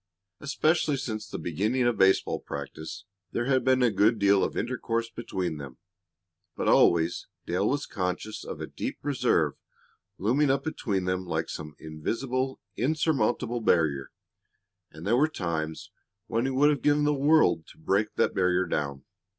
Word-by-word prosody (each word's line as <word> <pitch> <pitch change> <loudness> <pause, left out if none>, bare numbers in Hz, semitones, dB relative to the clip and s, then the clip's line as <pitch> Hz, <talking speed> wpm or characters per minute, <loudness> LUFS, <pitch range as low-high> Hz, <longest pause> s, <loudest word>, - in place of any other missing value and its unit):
Especially 155 +1 +1
since 110 -6 -4
the - - -5
beginning 105 +11 0
of 120 -1 +2
baseball 95 0 +3
practice 70 +5 -7 0.3
there 120 - 0
had 130 0 +2
been 130 -1 +3
a 120 - +4
good 105 +3 +3
deal 100 -1 +4
of - - -2
intercourse 115 -2 -2
between 95 -8 -3
them, 65 -3 -9 0.8
but - - -2
always 85 0 +3 0.2
Dale 95 +4 0
was 145 +2 -1
conscious 95 +2 -3
of - - -7
a - - -3
deep - - -5
reserve 145 -2 +1 0.6
looming 130 +9 +2
up 135 +1 +1
between 100 -11 -2
them 90 0 -1
like - - -2
some 75 -1 -7
invisible, 130 - -3 0.2
insurmountable 125 -4 0
barrier. 75 -9 +2 0.8
And 80 +3 -10
there 115 +4 +3
were 150 +4 +4
times 80 - -4 0.3
when 115 +2 -1
he 135 - 0
would 145 +3 +4
have 145 -4 -1
given 150 0 +3
the 150 0 +3
world 145 - +3
to - - -16
break 100 +6 0
that - - +2
barrier 90 0 +2
down. 70 -2 -3
110 Hz, 160 wpm, -27 LUFS, 90-135 Hz, 0.8 s, a